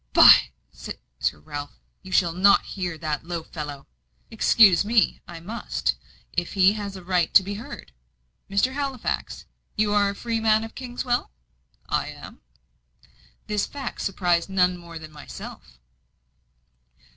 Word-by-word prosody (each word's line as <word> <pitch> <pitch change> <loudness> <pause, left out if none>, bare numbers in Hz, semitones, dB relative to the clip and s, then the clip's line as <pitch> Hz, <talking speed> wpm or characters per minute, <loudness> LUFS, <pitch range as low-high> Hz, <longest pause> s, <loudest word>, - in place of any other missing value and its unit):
"By, - - +8 0.2
Sir - - -5
Ralph, 145 -2 -7 0.2
you 190 - -12
shall 175 -2 +3
not 195 +3 +5
hear 180 -4 -3
that 155 -2 -3
low 170 -1 -4
fellow!" 145 -4 -7 0.5
"Excuse 205 -6 +5
me, 220 0 +2
I 170 -1 -8
must, 215 +8 -2 0.4
if 175 -1 -2
he 195 0 +5
has 205 -2 -5
a 190 - -9
right 180 -2 +1
to 195 - +9
be 200 +2 -5
heard. 210 +4 -9 0.6
Mr. 200 +7 +1
Halifax, 275 -3 -3 0.3
you 210 -1 +1
are 205 -1 +3
a 200 - -5
freeman 225 -1 +1
of 225 - -8
Kingswell?" 245 -1 -2 0.6
"I - - 0
am." - - -11 1.0
This 210 -1 -1
fact 275 -3 -6
surprised 175 -2 0
none 180 -1 +2
more 170 -1 -10
than 155 -1 -10
myself. 140 - -11
190 Hz, 135 wpm, -24 LUFS, 170-215 Hz, 1.0 s, to